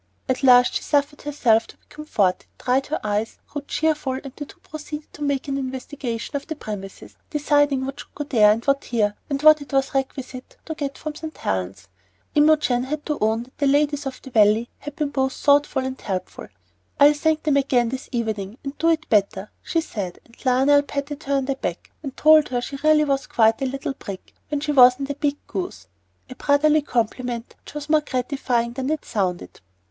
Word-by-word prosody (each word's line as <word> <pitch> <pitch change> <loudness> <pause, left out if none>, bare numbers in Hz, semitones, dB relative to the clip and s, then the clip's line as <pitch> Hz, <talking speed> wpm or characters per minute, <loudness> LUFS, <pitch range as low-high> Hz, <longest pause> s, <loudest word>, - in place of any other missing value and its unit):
At 255 0 -1
last 250 -2 +6
she - - -1
suffered 290 0 0
herself 235 -6 +2
to - - -15
be - - -39
comforted, 215 -12 -1
dried 260 +2 0
her 310 - -2
eyes, 210 +1 -2
grew 290 - -5
cheerful, 300 -1 -1
and 265 0 -7
the 290 - -7
two - - -16
proceeded 300 0 -8
to - - -13
make 285 -1 -1
an 275 0 -1
investigation 260 -1 -5
of 280 - -4
the 315 - -4
premises, 200 -7 -8
deciding 290 -2 +2
what 270 +1 -6
should - - -12
go 295 - -3
there 220 -7 +5
and 230 +2 -1
what 275 0 +1
here, 210 -3 +1 0.2
and 280 -1 -1
what 310 -1 +7
it 285 - -10
was 270 -1 +1
requisite 265 -1 -4
to 320 - -4
get 285 -3 -4
from 310 -1 -5
St. 315 +1 -8
Helen's. 95 -1 -3 0.5
Imogen 295 -5 +3
had 300 +2 -4
to 300 -2 -2
own 220 +2 +1
that 255 - -21
the 285 - +2
ladies 290 0 +2
of 260 - -6
the 265 - -10
Valley 220 +1 +3
had 295 0 -8
been 300 -2 -1
both 265 -1 0
thoughtful 285 -2 +2
and 260 0 -5
helpful. 190 -3 -5 0.5
"I'll 290 +1 +7
thank 310 +1 0
them 295 -2 +2
again 250 -4 +2
this 260 +2 -6
evening 220 -3 -3
and 275 0 -5
do 330 - +3
it 315 -1 +1
better," 200 -1 +1
she 330 - 0
said; 195 - -5
and 230 - -21
Lionel 270 +3 +4
patted 285 +1 -5
her 275 -1 +1
back, 270 0 -4
and 275 -4 -7
told 310 0 +6
her 245 -1 0
she 275 +3 -6
really 310 0 +5
was 275 -2 -1
quite 225 +1 +3
a 270 - +1
little 275 +1 -4
brick 200 -8 -9 0.2
when 295 -1 -2
she 300 0 -1
wasn't 270 +1 +5
a - - -1
big 290 0 -1
goose, 370 -1 -5 0.4
a 260 - -9
brotherly 300 +3 +3
compliment 240 -2 -2
which - - -14
was 295 -1 -5
more 310 0 +4
gratifying 250 -3 -1
than 265 +2 -3
it 310 -1 -2
sounded. 180 - -3
275 Hz, 205 wpm, -23 LUFS, 240-295 Hz, 0.5 s, what